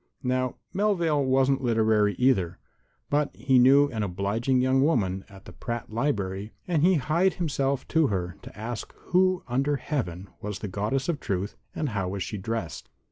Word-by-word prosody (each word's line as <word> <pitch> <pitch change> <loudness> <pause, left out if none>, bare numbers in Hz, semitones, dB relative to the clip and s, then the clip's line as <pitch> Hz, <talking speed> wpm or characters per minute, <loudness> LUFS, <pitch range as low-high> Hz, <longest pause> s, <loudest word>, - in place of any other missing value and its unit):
Now, 130 0 0 0.2
Melvale 175 -7 +2
wasn't 135 +1 +2
literary, 110 -4 +3
either; 95 -9 +2 0.5
but 145 0 +2
he 130 +2 +3
knew 140 +3 +6
an 110 -5 -3
obliging 105 +7 0
young 130 +1 +3
woman 95 - +1
at 95 -1 -14
the - - -10
Pratt 115 +3 -5
Library, 105 -5 -2
and 170 -5 +1
he 185 +3 +5
hied 170 +6 +2
himself 140 -5 -1
to 160 -3 +3
her 90 -4 -2
to - - -12
ask 115 +1 -5
who 185 0 +1
under 135 +4 +1
Heaven 100 - -3
was 105 -1 -4
the 105 - -5
Goddess 105 +8 -1
of 165 -5 -1
Truth 100 -1 -3 0.2
and 150 - -1
how 100 -4 -2
was 95 -1 -3
she 105 - -5
dressed. 110 -3 -4
125 Hz, 170 wpm, -27 LUFS, 100-145 Hz, 0.5 s, knew